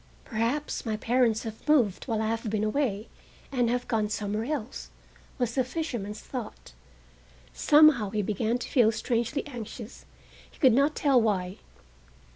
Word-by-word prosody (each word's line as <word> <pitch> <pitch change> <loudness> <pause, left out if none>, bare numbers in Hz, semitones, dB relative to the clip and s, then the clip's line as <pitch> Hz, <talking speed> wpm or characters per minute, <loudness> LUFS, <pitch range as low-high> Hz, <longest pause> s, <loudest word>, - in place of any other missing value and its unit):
"Perhaps 235 +7 -2
my 220 -2 -2
parents 230 -1 +1
have 220 +3 -8
moved 240 -11 +3
while 220 -3 -1
I - - 0
have 225 0 -2
been 215 0 -1
away, 215 -2 -1 0.4
and 245 -3 +1
have 245 +1 -1
gone 220 -3 0
somewhere 210 +1 -2
else," 270 -4 -4 0.5
was 245 -3 -1
the 260 - +2
fisherman's 240 -7 -4
thought. 240 - -8 0.8
Somehow 295 -8 +5
he 210 0 -1
began 215 +4 0
to 245 - -6
feel 235 -5 +4
strangely 235 +5 -1
anxious, 235 -3 -9 0.4
he - - -21
could 260 -6 +5
not 280 +5 +3
tell 275 -4 +3
why. 190 -4 -1
230 Hz, 150 wpm, -27 LUFS, 215-260 Hz, 0.8 s, Somehow